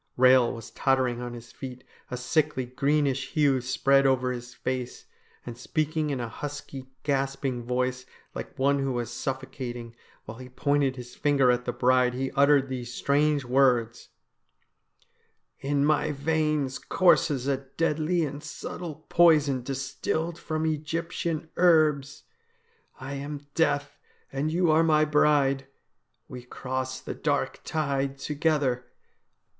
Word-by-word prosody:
Eehel 130 -1 +6
was 115 -2 -10
tottering 130 -3 +1
on 120 0 -5
his 120 0 -10
feet, 125 -2 -8 0.3
a 125 - -4
sickly, 130 +1 0
greenish 135 +1 0
hue 145 -5 +3
spread 135 +2 +3
over 130 -1 +2
his 125 0 -6
face, 125 -1 -4 0.4
and 120 - -6
speaking 155 +4 -1
in 140 -3 -2
a 120 - -3
husky, 140 +1 -7 0.2
gasping 135 -2 -1
voice, 125 +1 -2 0.3
like - - -7
one 140 +1 +2
who 135 -1 -1
was 120 -1 -3
suffocating, 125 -3 -5 0.3
while 110 +3 -9
he 130 0 -9
pointed 140 +1 +1
his 125 -1 -9
finger 140 -4 +3
at 125 0 -1
the - - -1
bride, 125 0 +2
he 130 +1 -2
uttered 140 0 +4
these 125 -2 -5
strange 145 +2 +1
words: 125 -3 +2 0.7
' - - -42
In 140 0 +3
my 150 0 +2
veins 150 -2 0
courses 150 -8 +3
a 140 -1 +1
deadly 155 +4 0
and 145 0 -6
subtle 160 -3 -7
poison 150 -6 +4
distilled 140 +5 -3
from 155 0 -2
Egyptian 160 +1 -2
herbs. 155 -6 +3 0.8
I 135 +1 -6
am 145 +1 -6
Death 145 -3 0 0.3
and 140 +3 -1
you 170 0 +2
are 155 +1 +5
my 155 -1 +4
bride; 145 -3 +2 0.6
we 125 -1 -8
cross 130 +1 -4
the - - -6
dark - - -1
tide 140 -3 -1
together.' 145 -4 0
135 Hz, 135 wpm, -27 LUFS, 125-150 Hz, 0.8 s, Eehel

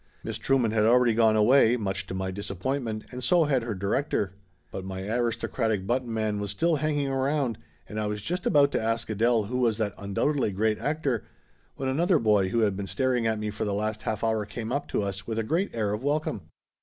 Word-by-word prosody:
Miss - - -4
Trueman 130 -5 +2
had 110 -1 +2
already 120 +1 +5
gone 110 -1 +4
away, 120 +2 +5
much 95 -3 -3
to 95 - -5
my 95 0 -2
disappointment, 110 +4 -3
and 125 0 -6
so 170 +7 +4
had 140 -4 +2
her 115 -2 -3
di 95 +2 -5
rector. 100 -4 0 0.4
But 95 - -5
my 95 0 -5
aristocratic 115 -2 -1
button 120 +2 -1
man 110 -2 -1
was 100 0 -3
still 165 - +1
hang 155 +1 0
ing 140 - 0
around, 135 -2 0 0.3
and 105 - -5
I 105 - -1
was 105 -1 -4
just 180 +5 -2
about 140 -1 +4
to - - 0
ask 115 0 -1
Adele 115 +1 +2
who 125 +5 -3
was 115 -4 +2
that 105 -3 -1
undoubtedly 105 +6 0
great 110 +2 +1
actor, 145 -7 -1 0.5
when 135 - -3
another 165 +6 +3
boy 105 -6 +3
who 115 +3 +1
had 105 -3 +2
been 100 0 -4
staring 125 0 +1
at 110 -1 +1
me 105 0 -3
for 105 - -4
the 100 -1 -1
last 110 +1 -2
half 110 -1 -3
hour 110 -1 +1
came 110 +2 -6
up 145 - -1
to - - -1
us 100 -1 -5
with 110 -1 -3
a 115 - +1
great 170 - 0
air 105 -3 -1
of 105 +4 -4
welcome. 145 - -1
110 Hz, 230 wpm, -27 LUFS, 105-130 Hz, 0.5 s, already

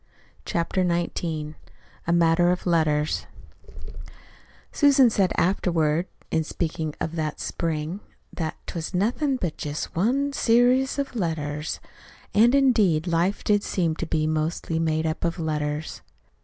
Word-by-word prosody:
CHAPTER 170 +2 -1
XIX 170 -3 -2 0.5
A - - +2
MATTER 170 0 +4
OF 180 - -2
LETTERS 155 -3 +1 1.4
Susan 275 -5 +5
said 195 -3 +2
afterward, 170 -2 +1 0.2
in 160 - +1
speaking 155 -1 -3
of 160 - -3
that 155 -1 -2
spring, 165 +2 -3 0.3
that 160 -2 -3
"'twas 170 +2 -5
nothin' 250 +9 +1
but 180 -11 -3
jest 150 0 -5
one 270 +10 +1
serious 250 +2 +3
of 280 -2 -3
letters." 155 -5 -2 0.5
And, 235 +5 +5
indeed, 215 - +3
life 175 +3 0
did 205 -1 +3
seem 170 -5 -1
to 170 - -4
be 155 -1 0
mostly 155 +1 -1
made 160 -1 0
up 160 0 -2
of 170 +1 -1
letters. 150 -1 -3
170 Hz, 130 wpm, -25 LUFS, 155-205 Hz, 1.4 s, Susan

